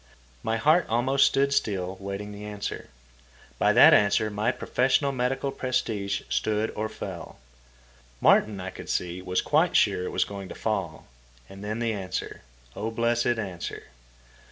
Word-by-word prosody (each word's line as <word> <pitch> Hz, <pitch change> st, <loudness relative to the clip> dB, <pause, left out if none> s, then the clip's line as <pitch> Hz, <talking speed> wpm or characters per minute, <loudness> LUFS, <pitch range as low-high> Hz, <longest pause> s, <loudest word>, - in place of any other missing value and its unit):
My 110 Hz, 0 st, -1 dB
heart 155 Hz, +9 st, +3 dB
almost 130 Hz, +4 st, +3 dB
stood 140 Hz, +1 st, +1 dB
still 95 Hz, -7 st, -1 dB
waiting 100 Hz, +1 st, -5 dB
the 105 Hz, 0 st, -9 dB
answer. 105 Hz, -1 st, -6 dB, 0.7 s
By -, -, +4 dB
that -, -, +8 dB
answer 105 Hz, +1 st, +3 dB
my 105 Hz, +4 st, 0 dB
professional 130 Hz, +2 st, +1 dB
medical 135 Hz, +1 st, -1 dB
prestige 105 Hz, -7 st, -2 dB
stood 110 Hz, 0 st, 0 dB
or 110 Hz, +1 st, -3 dB
fell. -, -, -8 dB, 0.8 s
Martin, 105 Hz, -, +4 dB
I 90 Hz, 0 st, -5 dB
could -, -, -10 dB
see, 90 Hz, +1 st, -2 dB
was 90 Hz, 0 st, -1 dB
quite -, -, +2 dB
sure 90 Hz, -, +3 dB
it -, -, -3 dB
was -, -, +1 dB
going 100 Hz, -2 st, -8 dB
to -, -, -8 dB
fall. 95 Hz, -8 st, -3 dB, 0.4 s
And 95 Hz, +1 st, -11 dB
then 105 Hz, +2 st, -3 dB
the 115 Hz, -1 st, -1 dB
answer—O 90 Hz, -, -6 dB
blessed 120 Hz, +1 st, +1 dB
answer! 95 Hz, -, -6 dB
105 Hz, 150 wpm, -26 LUFS, 95-120 Hz, 0.8 s, that